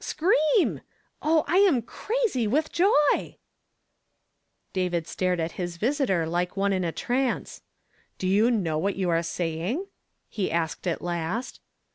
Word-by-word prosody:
scream! 320 +2 +2 0.4
Oh, 315 0 +2
I 345 +5 +2
am 360 - +4
crazy 425 - -1
with 305 +8 0
joy! 340 -5 +2 0.6
" - - -50 0.7
David 180 -3 -1
stared 180 +1 -1
at 165 0 -1
his 175 -1 -4
visitor 230 - +1
like 175 +3 -2
one 200 0 +2
in 185 -1 0
a 170 - -1
trance. 250 +8 -2 0.6
"Do 185 - -2
you 210 +5 +4
know 175 -10 0
what 195 +4 0
you 185 -2 0
are 165 0 +2
saying?" 170 - -2 0.4
he' 200 -4 -2
asked 165 +2 -2
at 170 - -2
last. 175 +7 -3
195 Hz, 145 wpm, -26 LUFS, 170-285 Hz, 0.7 s, am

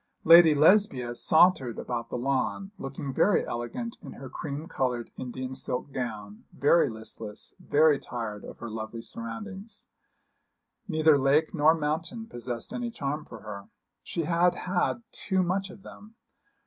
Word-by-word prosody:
Lady 165 -1 +8
Lesbia 150 - +4
sauntered 150 -3 +4
about 120 -1 -4
the - - -3
lawn, 140 +9 -1
looking 135 0 -5
very 200 +7 +3
elegant 120 - -5
in - - -9
her 135 -2 -10
cream 150 +1 -5
coloured 125 -7 -2
Indian 130 +1 -5
silk 130 +1 -4
gown, 110 -5 -5
very 145 0 +3
listless, 110 -1 -7
very 150 -1 +4
tired 115 -4 -6
of - - -10
her 120 - -7
lovely 110 +1 -6
surroundings. 195 - -7 1.0
Neither 155 -2 +4
lake 140 +4 +3
nor 155 +2 +5
mountain 165 +9 -3
possessed 120 - -6
any 245 -1 -3
charm 150 -7 -4
for 115 - -11
her. 100 -2 -8 0.3
She 170 - -3
had 175 +2 +2
had 185 +5 -1
too 190 -2 0
much 190 +2 -1
of 190 +1 -13
them. 215 +2 -13
145 Hz, 145 wpm, -28 LUFS, 120-175 Hz, 1.0 s, Lady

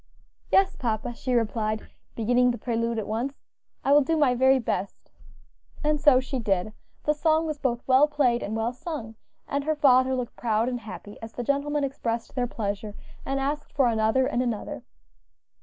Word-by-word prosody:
"Yes, 390 -1 +4
papa," 230 -1 -2
she 250 +1 -2
replied, 215 -1 0 0.3
beginning 245 +2 +3
the 240 - -1
prelude 230 -1 -1
at 220 - -2
once, 240 +6 -2 0.5
"I 275 - +3
will 290 +1 +7
do 320 +4 0
my 285 -5 +4
very 265 +2 +4
best." 210 -5 -4 0.7
And 300 -1 +1
so 290 -4 +6
she 265 0 -3
did. 205 -1 0 0.3
The 300 - +2
song 315 +1 +2
was 305 -2 -3
both 240 -3 -1
well 265 +3 +6
played 270 -5 +1
and 215 - -3
well 225 +2 -1
sung, 250 -5 -6 0.3
and 280 0 -1
her 310 0 +1
father 260 -3 +4
looked 250 -2 -4
proud 225 -1 0
and 250 -1 -2
happy 210 -2 -10
as 225 0 -8
the 245 - -4
gentlemen 285 +3 0
expressed 235 -4 -3
their 250 -2 0
pleasure 205 -2 -4 0.3
and 270 0 0
asked 290 +2 -3
for 270 -4 +3
another 220 +3 +2
and 245 - 0
another. 235 -4 -3
250 Hz, 180 wpm, -26 LUFS, 225-280 Hz, 0.7 s, will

